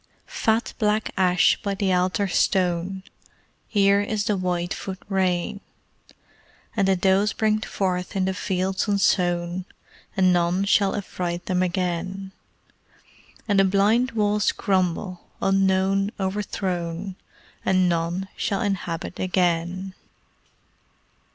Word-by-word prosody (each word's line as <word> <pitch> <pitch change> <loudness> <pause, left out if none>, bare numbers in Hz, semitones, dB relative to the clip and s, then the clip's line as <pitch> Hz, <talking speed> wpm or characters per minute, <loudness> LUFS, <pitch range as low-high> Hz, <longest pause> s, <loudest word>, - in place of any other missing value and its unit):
Fat 225 +1 0
black 215 -1 +1
ash 180 -2 +3
by 200 -1 -2
the 190 -1 +1
altar 185 +2 +1
stone, 185 0 0 0.6
Here 200 -1 +3
is 205 0 -1
the 210 - +1
white 180 -1 -1
foot 190 -1 -6
rain, 190 0 0 1.1
And 200 -3 +2
the 195 - +4
does 190 +3 +2
bring 215 -1 +1
forth 180 -3 -2
in 190 -1 +1
the 190 - 0
fields 190 +1 -1
unsown, 180 -3 +1 0.5
And 185 -1 +4
none 175 +2 +2
shall 200 -1 +3
affright 180 -3 -4
them 180 -1 0
again; 185 +1 -2 1.2
And 200 -2 +3
the - - +6
blind 210 +6 +2
walls 210 -1 +2
crumble, 185 -1 -1 0.2
unknown, 195 0 +2
o'erthrown 190 -2 -3 0.5
And 185 -1 +3
none 170 +2 -1
shall 195 - -1
inhabit 180 -5 -3
again! 180 0 0
190 Hz, 110 wpm, -24 LUFS, 180-200 Hz, 1.2 s, the